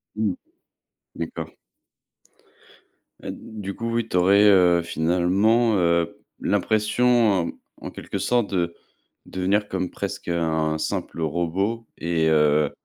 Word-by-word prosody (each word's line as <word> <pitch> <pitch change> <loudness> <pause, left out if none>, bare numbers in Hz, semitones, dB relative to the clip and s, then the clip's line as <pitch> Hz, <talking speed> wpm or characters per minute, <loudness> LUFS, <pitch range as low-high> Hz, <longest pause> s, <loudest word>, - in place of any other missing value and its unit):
Mmh 110 -1 0
mh, - - -8 0.8
d'accord. 85 - -5 1.7
Heu, - - -4
du 105 -3 -7
coup, 115 0 -4
oui, 115 -1 0
tu 95 - -1
aurais, 100 +3 +5
heu, 90 -4 +5
finalement, 95 +8 +2
heu, 85 -1 +1 0.2
l'impression, 110 -3 +2 0.3
en - - -7
quelque - - -6
sorte, 120 -5 0
de 85 -2 -1 0.5
devenir 100 +3 0
comme 95 -2 -3
presque - - -6
un 80 -2 0
simple 80 - -4
robot 90 +8 -1
et 80 -1 0
heu, 75 -1 +3
90 Hz, 115 wpm, -23 LUFS, 85-105 Hz, 1.7 s, aurais